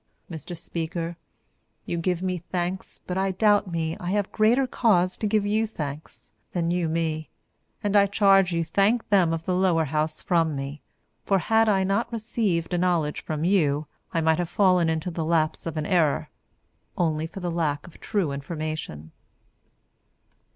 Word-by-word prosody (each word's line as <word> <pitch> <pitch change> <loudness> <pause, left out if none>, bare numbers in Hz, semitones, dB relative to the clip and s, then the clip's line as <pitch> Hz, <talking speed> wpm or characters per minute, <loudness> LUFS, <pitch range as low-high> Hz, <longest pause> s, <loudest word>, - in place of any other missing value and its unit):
Mr 165 +2 -7
Speaker, 165 +1 -4 0.7
you - - -3
give 175 +1 -1
me 185 -1 -1
thanks 180 +2 -4
but 180 +1 -2
I 195 0 +1
doubt 205 +1 +3
me 160 -1 -1
I 175 - -4
have 200 0 0
greater 235 +5 +3
cause 185 -8 +2
to 215 - -1
give 210 -1 +1
you 215 +2 +1
thanks, 150 -7 -7 0.2
than 170 -1 0
you 175 -2 0
me, 160 -1 -2 0.5
and 205 0 0
I 200 -1 +6
charge 195 -2 +4
you 170 -1 0
to 165 - -14
thank 215 +4 +2
them 190 -5 +4
of 165 0 -3
the 185 - 0
Lower 180 -3 +2
House 155 +2 -2
from 165 -4 +1
me. 140 +2 -5 0.4
For 195 - +2
had 220 +5 +3
I 195 -2 +3
not 200 +6 0
received 215 -7 -1
a 175 - +1
knowledge 170 -4 0
from 155 -1 -3
you, 155 -5 +2 0.3
I 165 - 0
might 160 0 +2
have 175 -1 -1
fallen 180 -3 +3
into 160 +2 -2
the 165 -1 -3
lapse 155 0 0
of 160 - -4
an 155 - -1
error, 160 -5 +1 0.7
only 160 -2 0
for 185 - -9
lack 165 -5 -1
of 175 - -15
true 190 -8 -1
information. 140 - -5
175 Hz, 170 wpm, -25 LUFS, 160-195 Hz, 0.7 s, I